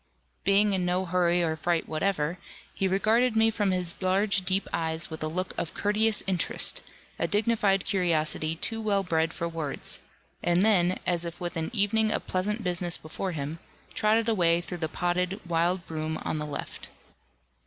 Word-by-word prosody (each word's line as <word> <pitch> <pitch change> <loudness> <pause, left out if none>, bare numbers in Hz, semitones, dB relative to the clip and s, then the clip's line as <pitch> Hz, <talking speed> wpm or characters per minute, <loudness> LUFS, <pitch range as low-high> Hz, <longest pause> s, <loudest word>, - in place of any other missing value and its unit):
Being 200 +1 +4
in 185 -1 0
no 180 +1 0
hurry 175 0 +2
or 160 -1 0
fright 165 +1 -1
whatever, 160 0 -1 0.3
he 195 - 0
regarded 220 +5 +2
me 225 0 +4
from 205 -2 0
his 180 -2 -1
large 195 +1 +2
deep 185 +2 0
eyes 160 0 -2
with 160 - -7
a 155 - -1
look 185 +4 -3
of 165 - -4
courteous 210 +1 +2
interest, 185 -2 +2 0.4
a - - +1
dignified 205 -3 +2
curiosity 165 -4 0
too 225 +7 -1
well 200 -2 +1
bred 165 -2 0
for 170 - -3
words; 160 -4 -3 0.4
and 175 +2 +2
then, 185 -4 +3
as 175 -1 +2
if 170 0 -5
with 175 -1 -4
an 160 -1 -2
evening 220 0 +2
of - - -2
pleasant 210 +4 -1
business 175 -1 +1
before 175 +4 -5
him, 150 +2 -4 0.3
trotted 220 -1 +2
away 170 -6 +3
through 175 0 -6
the 160 -1 -2
podded 180 +3 -1
wild 170 +1 +1
broom 155 0 -3
on 155 - -2
the 150 - -4
left. 145 - -7
180 Hz, 175 wpm, -27 LUFS, 165-200 Hz, 0.4 s, Being